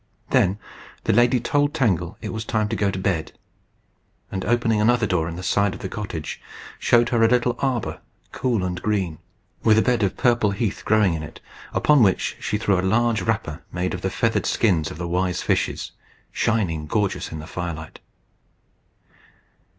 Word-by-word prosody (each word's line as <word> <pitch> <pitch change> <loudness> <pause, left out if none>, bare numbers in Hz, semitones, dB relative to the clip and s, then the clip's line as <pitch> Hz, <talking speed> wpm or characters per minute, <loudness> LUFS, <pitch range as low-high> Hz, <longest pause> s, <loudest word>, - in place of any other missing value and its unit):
Then 95 +3 +3 0.5
the - - +2
lady 120 +3 +4
told 145 +3 +1
Tangle 90 -8 0
it - - -5
was 110 0 -3
time 110 -1 0
to 115 - -1
go 105 -2 +1
to 95 - -3
bed; 95 -4 -1 1.0
and, 95 -1 -3
opening 115 -2 +2
another 120 +1 +3
door 90 -5 0
in 85 - -6
the 90 - -7
side 100 +1 +1
of - - -11
the 95 - -4
cottage, 90 -8 -5 0.4
showed 120 0 +4
her 120 -2 +1
a 115 - +6
little 125 0 +2
arbour, 130 -5 -1 0.3
cool 120 -7 0
and 90 0 -3
green, 95 -7 -1 0.4
with 110 -1 +5
a 110 - +4
bed 125 -2 +1
of 100 -2 0
purple 120 -4 +3
heath 100 +1 -2
growing 105 -4 +3
in 80 - -3
it, 75 - -9 0.3
upon 150 -3 +4
which 95 -5 +2
she 105 - -1
threw 100 -3 +1
a - - +1
large 110 +4 +2
wrapper 110 -9 -2
made 90 +1 -2
of 90 - -4
the 95 - -1
feathered 115 +4 0
skins 90 -9 +2
of - - -8
the 85 0 -4
wise 90 +1 -1
fishes, - - -1 0.4
shining 90 -10 0
gorgeous 100 +2 -1
in 80 - -5
the 75 - -7
firelight. 80 -2 -6
105 Hz, 180 wpm, -23 LUFS, 90-115 Hz, 1.0 s, a